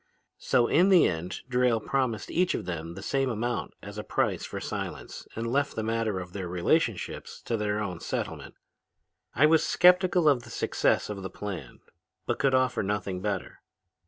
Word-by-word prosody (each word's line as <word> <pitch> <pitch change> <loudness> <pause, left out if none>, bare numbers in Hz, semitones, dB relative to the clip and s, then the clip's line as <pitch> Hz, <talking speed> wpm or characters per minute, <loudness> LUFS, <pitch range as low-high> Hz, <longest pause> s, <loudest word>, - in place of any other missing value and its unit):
"So 120 - +3
in 175 +10 +4
the 185 -3 +7
end 85 +2 -4
Drayle 125 -2 +2
promised 125 -1 -1
each 180 +1 +2
of - - -4
them 85 -1 -5
the 95 - -8
same 135 +2 0
amount 120 +1 -2
as - - -7
a - - -4
price - - 0
for - - -5
silence - - -6
and 115 - -3
left 140 +4 0
the 110 - -2
matter 110 -3 -1
of 90 -1 -8
their 95 -3 -4
relationships 90 - -1
to 115 - -1
their 105 -1 -1
own 90 -5 -3
settlement. - - -4 0.8
"I 145 - +5
was 160 0 +5
skeptical 180 -2 +4
of 140 -4 +4
the - - -13
success - - +1
of 100 -2 -6
the 95 - -5
plan 100 0 -7 0.4
but - - -1
could 135 -1 +3
offer 130 -1 +2
nothing 100 -2 -2
better. 100 -2 -3
115 Hz, 180 wpm, -28 LUFS, 95-135 Hz, 0.8 s, the